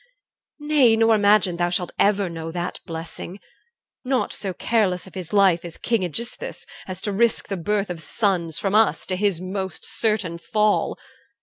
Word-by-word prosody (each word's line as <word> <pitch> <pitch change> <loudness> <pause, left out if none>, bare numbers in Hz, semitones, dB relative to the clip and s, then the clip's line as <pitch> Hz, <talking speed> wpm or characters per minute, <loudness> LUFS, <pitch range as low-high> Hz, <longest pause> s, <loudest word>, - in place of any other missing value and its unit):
Nay, 295 -6 +4
nor 225 0 +4
imagine 205 -4 +4
thou 175 0 +1
shalt 180 0 -1
ever 200 -1 +3
know 165 -1 -6
That 175 +1 -4
blessing. 165 +3 -7 0.6
Not 260 -1 0
so 195 -2 -3
careless 185 -1 0
of 190 - -14
his 180 -3 -7
life 195 -4 +4
Is 170 -2 -8
King 230 -4 0
Aegisthus, 235 - -5 0.2
as 185 -1 -6
to 205 - -1
risk 225 +2 +1
the 195 - -1
birth 200 +2 -1
Of 170 -2 -6
sons 175 -3 0
from 195 -1 -1
us, 220 0 +3
to 185 - -1
his 195 -3 +1
most 190 +1 -4
certain 205 -7 -1
fall. 210 +3 +1
195 Hz, 170 wpm, -23 LUFS, 175-215 Hz, 0.6 s, Nay